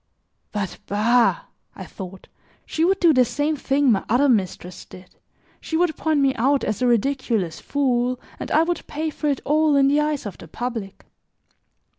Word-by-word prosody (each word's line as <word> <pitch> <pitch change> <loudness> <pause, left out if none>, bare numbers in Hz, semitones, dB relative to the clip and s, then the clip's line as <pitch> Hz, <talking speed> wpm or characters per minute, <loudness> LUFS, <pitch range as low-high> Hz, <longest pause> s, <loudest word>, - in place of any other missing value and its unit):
"But, 200 -3 -4
bah," 235 - +2 0.3
I - - -8
thought, 190 -1 -10 0.4
"she 320 - -1
would 385 +3 +2
do 335 -3 +5
the 255 -2 +5
same 290 +5 -1
thing 275 -1 +2
my 195 - +1
other 250 +6 +3
mistress 185 -6 -1
did, 185 0 -15 0.4
she 320 - -3
would 340 -2 +1
point 310 -3 0
me 270 -1 +3
out 270 +4 +2
as 215 +3 -2
a 250 - +3
ridiculous 235 - 0
fool, 250 -3 0 0.2
and - - -5
I 315 - +4
would 345 0 -3
pay 310 +1 -3
for 300 - -4
it 280 -2 0
all 305 0 +3
in 275 -1 +4
the 290 +2 +3
eyes 300 -4 -2
of 200 -4 -7
the - - -11
public." 225 0 -6
265 Hz, 180 wpm, -22 LUFS, 215-300 Hz, 0.4 s, do